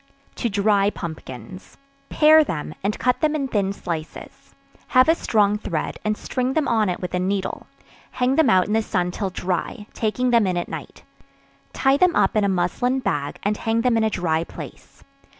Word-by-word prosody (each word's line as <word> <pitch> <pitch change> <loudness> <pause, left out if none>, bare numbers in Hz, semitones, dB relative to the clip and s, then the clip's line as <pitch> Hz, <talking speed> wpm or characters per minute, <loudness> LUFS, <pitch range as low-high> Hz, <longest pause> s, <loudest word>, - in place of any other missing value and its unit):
To 235 - -1
Dry 200 0 +2
Pumpkins. 160 - -9 0.3
Pare 310 0 +6
them, 155 - -4
and 205 +2 -1
cut 250 0 0
them 310 -1 +2
in 275 -3 -1
thin 200 -5 0
slices; 165 -5 -7 0.3
have 255 +1 +4
a 325 - +6
strong 210 -9 +1
thread, 165 -7 -4
and 215 0 -1
string 255 +1 -2
them 310 -1 0
on 220 -4 +2
it 180 - -2
with 180 - -5
a 180 - 0
needle; 190 +1 -2 0.5
hang 250 +1 +1
them 315 -5 +4
out 185 -3 +4
in 210 - -2
the 225 - +3
sun 180 -4 -1
till 195 +1 -3
dry, 185 +4 -3
taking 245 +3 0
them 230 -4 +4
in 180 -1 -1
at 175 - -2
night; - - -8 0.7
tie 270 0 +2
them 360 +1 +3
up - - +2
in 215 - +3
a 200 - +2
muslin 190 +8 0
bag, 145 - -2
and 210 +1 0
hang 225 0 0
them 245 -1 +2
in 225 - +2
a 220 - +2
dry 165 -5 0
place. - - -11
210 Hz, 195 wpm, -22 LUFS, 180-250 Hz, 0.7 s, Pare